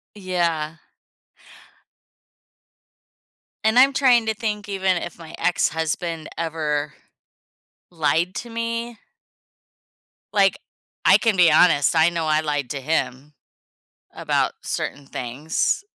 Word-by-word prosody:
Yeah. 170 -5 -2 2.9
And 220 +2 +3
I'm 270 +2 +6
trying 250 -4 +4
to 220 - 0
think 210 -2 -4
even 190 -2 0
if 175 0 -6
my 160 -1 -10
ex-husband 160 0 -1
ever 155 -3 -2 1.0
lied 165 +2 0
to 240 - -6
me. 230 0 -4 1.4
Like, 200 +6 +3 0.5
I - - +7
can 225 -4 +1
be 175 -3 +5
honest. 155 -1 +4
I 160 +1 +5
know 170 -2 -3
I 155 0 +2
lied 145 -4 -2
to 140 -2 -4
him 145 -1 -2 0.8
about - - 0
certain 145 - -4
things, 135 - -2
170 Hz, 105 wpm, -22 LUFS, 155-210 Hz, 2.9 s, I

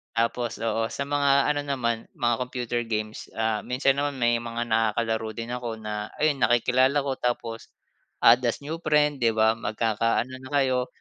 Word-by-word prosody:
Tapos, 115 +1 -1
oo 115 0 0
sa 140 - -3
mga 140 -1 +3
ano 145 - -2
naman 115 -5 -2
mga 120 0 +2
computer 120 -1 -2
games, 110 -1 -4
ah, 110 -2 0
minsan 135 +2 +1
naman 145 -2 -2
may 120 -1 +2
mga 120 0 -3
nakakalaro 110 0 0
din 115 +1 -4
ako 120 -2 -4
na 105 -1 -5
ayun 150 -2 +2
nakikilala 130 +4 +3
ko 135 - 0
tapos, 115 -2 -3 0.5
add 120 +2 +7
as 120 - 0
new 160 +3 -3
friend 150 -2 +2
di 115 - +5
ba, 110 0 +4
magkakaano 115 +2 0
na 130 - -9
kayo, 130 -1 0
120 Hz, 170 wpm, -26 LUFS, 115-130 Hz, 0.5 s, add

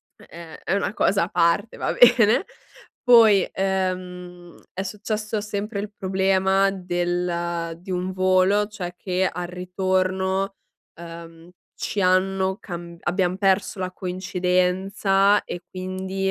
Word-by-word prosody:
è 170 -1 -13
è - - -2
una 200 +1 -1
cosa 195 -3 +2
a - - -7
parte, 170 +3 +1
va - - -1
bene. 240 - +5 0.6
Poi, 225 -6 +6
ehm, 180 -2 -3 0.2
è 190 - -4
successo 210 +2 -3
sempre 210 0 -4
il 210 0 -6
problema 190 +1 +2
del 175 -2 -2
di 190 - -10
un 180 +1 -2
volo, 185 +2 +3
cioè 180 -5 -6
che 185 0 0
al 180 0 -5
ritorno, 185 +1 -1 0.5
uhm, 165 0 -11 0.3
ci 205 - -3
hanno 190 +1 +2
camb 170 -2 -8
abbiam 180 0 0
perso 195 0 +1
la 185 0 -3
coincidenza 185 +2 +1
e 175 - -6
quindi, 190 +1 -3
185 Hz, 120 wpm, -23 LUFS, 180-195 Hz, 0.6 s, Poi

